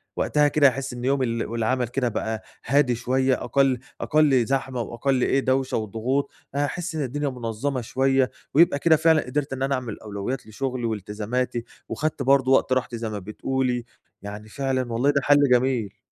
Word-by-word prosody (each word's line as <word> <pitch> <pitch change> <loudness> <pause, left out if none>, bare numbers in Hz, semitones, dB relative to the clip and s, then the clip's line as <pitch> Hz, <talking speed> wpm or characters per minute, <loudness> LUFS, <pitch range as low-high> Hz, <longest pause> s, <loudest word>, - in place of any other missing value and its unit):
وقتها 150 -1 +2
كده 145 0 +5
هاحس 135 -1 -2
إن 120 0 -5
يوم 135 0 +2
ال 115 -2 -1
والعمل 115 +2 -1
كده 125 0 -1
بقى 110 0 -3 0.2
هادي 135 -1 +3
شوية، 130 +2 0
أقل 135 -3 +2 0.2
أقل 145 -5 +3
زحمة 130 -1 -1
وأقل 125 +3 -1
إيه، 135 - +2
دوشة 130 0 0
وضغوط، 115 +6 -2 0.2
هاحس 160 +4 -2
إن 155 - -1
الدنيا 145 +3 -2
منظَمة 125 +2 -3
شوية، 135 +2 +1 0.2
ويبقى 150 -1 +5
كده 160 +2 +5
فعلًا 160 0 +4
قدرت 140 +2 -2
إن 135 0 -3
أنا 135 0 +1
أعمل 125 -4 -5
أولويات 110 +4 -5
لشغلي 125 +2 -3
والتزاماتي، 110 +3 -2 0.3
وخدت 155 -2 -2
برضو 135 0 +3
وقت 130 - +3
راحتي 125 -2 -1
زي 115 -1 -4
ما 105 -1 -4
بتقولي، 125 +5 -2 0.4
يعني 105 +2 -8
فعلًا 130 -3 -2
والله 125 +5 +2
ده 140 -1 +2
حلّ 145 -1 +5
جميل. 120 -5 +1
130 Hz, 170 wpm, -24 LUFS, 115-140 Hz, 0.4 s, كده